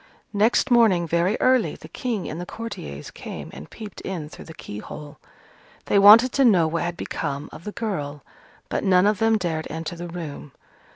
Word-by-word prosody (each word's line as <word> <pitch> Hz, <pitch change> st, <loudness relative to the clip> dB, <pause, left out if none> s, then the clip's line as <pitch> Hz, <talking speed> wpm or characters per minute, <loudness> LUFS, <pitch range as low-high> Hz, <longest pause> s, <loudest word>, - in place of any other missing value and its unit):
Next 220 Hz, +6 st, +2 dB
morning 210 Hz, -8 st, +4 dB
very 170 Hz, +5 st, +1 dB
early, 255 Hz, -2 st, +3 dB
the -, -, -12 dB
King 230 Hz, -7 st, -3 dB
and 160 Hz, +3 st, -5 dB
the -, -, -5 dB
courtiers 75 Hz, -, -7 dB
came -, -, -8 dB
and 70 Hz, +3 st, -10 dB
peeped 215 Hz, -4 st, -9 dB
in 170 Hz, -6 st, -5 dB
through -, -, -11 dB
the 160 Hz, -, -10 dB
keyhole. 145 Hz, +8 st, -9 dB, 0.7 s
They 200 Hz, -, +3 dB
wanted 220 Hz, +5 st, +8 dB
to 275 Hz, -, +2 dB
know 190 Hz, -9 st, +5 dB
what 165 Hz, +1 st, -1 dB
had 175 Hz, 0 st, -3 dB
become 140 Hz, +2 st, -4 dB
of 170 Hz, -, -11 dB
the 210 Hz, -, -4 dB
girl, 150 Hz, -, -4 dB, 0.4 s
but -, -, -2 dB
none 185 Hz, -1 st, +4 dB
of 210 Hz, -1 st, +2 dB
them 225 Hz, 0 st, +3 dB
dared 165 Hz, -5 st, -2 dB
enter 160 Hz, +1 st, -5 dB
the 175 Hz, +1 st, -6 dB
room. 155 Hz, -5 st, -7 dB
175 Hz, 185 wpm, -24 LUFS, 155-215 Hz, 0.7 s, wanted